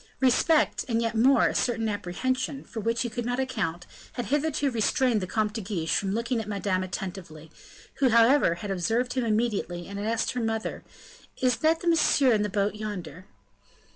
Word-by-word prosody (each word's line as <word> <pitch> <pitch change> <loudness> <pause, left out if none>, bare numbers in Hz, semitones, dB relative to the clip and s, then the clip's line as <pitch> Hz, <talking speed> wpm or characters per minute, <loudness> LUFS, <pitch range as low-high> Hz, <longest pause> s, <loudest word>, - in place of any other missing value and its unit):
Respect, 275 +5 +3
and 230 -1 +1
yet 230 -1 -1
more, 250 +5 +4
a - - +1
certain 230 -2 0
apprehension, 255 +8 -2
for 225 - -7
which 230 +3 0
he 240 - -3
could 240 +1 -3
not 245 +2 -2
account, 200 -10 -2 0.3
had 245 - -4
hitherto 290 -1 0
restrained 235 0 +1
the 185 - -3
Comte 215 +1 -1
de 225 - -4
Guiche 180 -5 -2
from 195 -1 0
looking 230 +1 -1
at 215 - -8
Madame 200 -2 -1
attentively, 180 -4 -7 0.5
who, 270 -2 +4
however, 230 -4 +4
had 200 +4 -6
observed 230 +7 0
him 255 -1 0
immediately, 215 -6 -1
and 200 0 -6
had 205 - -3
asked 230 +3 0
her 250 -2 -3
mother, 225 0 -3 0.6
"Is 250 -3 +1
not 320 +1 +2
that 350 - -4
Monsieur 300 -6 +4
in 215 - +2
the 210 - -1
boat 200 +1 0
yonder?" 185 -6 -7
225 Hz, 190 wpm, -27 LUFS, 200-250 Hz, 0.6 s, more